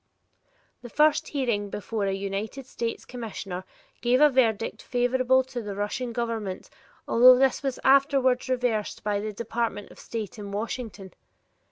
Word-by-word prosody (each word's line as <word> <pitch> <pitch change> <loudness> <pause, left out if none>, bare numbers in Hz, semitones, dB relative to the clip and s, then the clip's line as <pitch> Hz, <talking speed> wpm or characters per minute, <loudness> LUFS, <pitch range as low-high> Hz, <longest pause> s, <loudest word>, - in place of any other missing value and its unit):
The 240 - -9
first 305 +3 +3
hearing 235 -8 -1
before 205 +1 -3
a - - +1
United 200 +7 -4
States 230 -2 -4
Commissioner 195 -6 -6 0.4
gave 245 +1 +3
a 300 0 +6
verdict 225 -4 +1
favorable 255 +1 +2
to 255 -2 -6
the 205 -2 -6
Russian 210 +5 -3
Government 225 -5 -4 0.4
although 250 +2 +7
this 265 0 +2
was 270 -3 -3
afterward 270 -2 +3
reversed 245 -4 -1
by 205 -1 0
the 215 +1 -3
Department 225 -1 -3
of - - -15
State 220 -1 -6
in 200 -1 -7
Washington. 205 -3 -5
235 Hz, 145 wpm, -26 LUFS, 205-255 Hz, 0.4 s, although